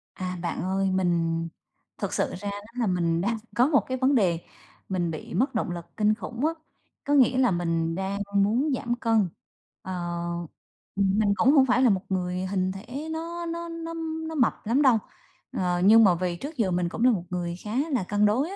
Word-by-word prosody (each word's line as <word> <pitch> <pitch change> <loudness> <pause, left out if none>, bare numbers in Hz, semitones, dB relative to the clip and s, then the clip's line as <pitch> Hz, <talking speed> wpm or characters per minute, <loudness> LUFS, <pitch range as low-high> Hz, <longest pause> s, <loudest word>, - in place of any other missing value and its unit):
À, 185 -1 -4
bạn 170 - -3
ơi, 190 +1 0
mình 170 -3 +1 0.6
thực - - -3
sự - - 0
ra 200 +2 -4
đó 205 +2 -9
là 235 - +1
mình 170 -2 +1
đang 225 +5 0 0.2
có 245 +2 +5
một 290 -3 +4
cái 260 - -2
vấn 265 +2 +3
đề, 180 -8 +2 0.5
mình 175 -3 -1
bị 155 - -7
mất 245 +7 +1
động 215 - -1
lực 170 -1 -6
kinh 215 -1 +3
khủng 235 +4 -4
á. 320 - +2 0.5
Có 285 - 0
nghĩa 260 -2 +5
là 250 -5 +4
mình 165 -1 0
đang 195 +2 -2 0.2
muốn 225 +9 +2
giảm 240 -1 -2
cân, 225 -5 +2 0.5
ờ 185 - -7 1.0
ừm, 195 +1 +2
mình 205 -2 +3
cũng 265 +8 +4
không 275 -3 +6
phải 255 0 +3
là 255 - +5
một 190 -3 +2
người 180 0 -1
hình 185 -1 0
thể 250 +11 -7
nó 335 +2 -4
nó 335 0 -4
nó 330 0 -6 0.3
nó 320 - -5
mập 250 -5 +3
lắm 240 +6 +2
đâu, 260 -5 +5 0.6
ờ, 180 -1 0
nhưng 225 +3 +8
mà 185 -4 +5
vì 175 0 -2
trước 285 - -7
giờ 210 -6 +1
mình 175 -1 0
cũng 225 - -3
là 255 - +6
một 190 -7 -1
người 175 -1 -3
khá 210 - -6 0.2
là 255 -8 +1
cân 205 +3 +1
đối 250 +10 +2
á 390 - -6
205 Hz, 215 wpm, -26 LUFS, 180-255 Hz, 1.0 s, nhưng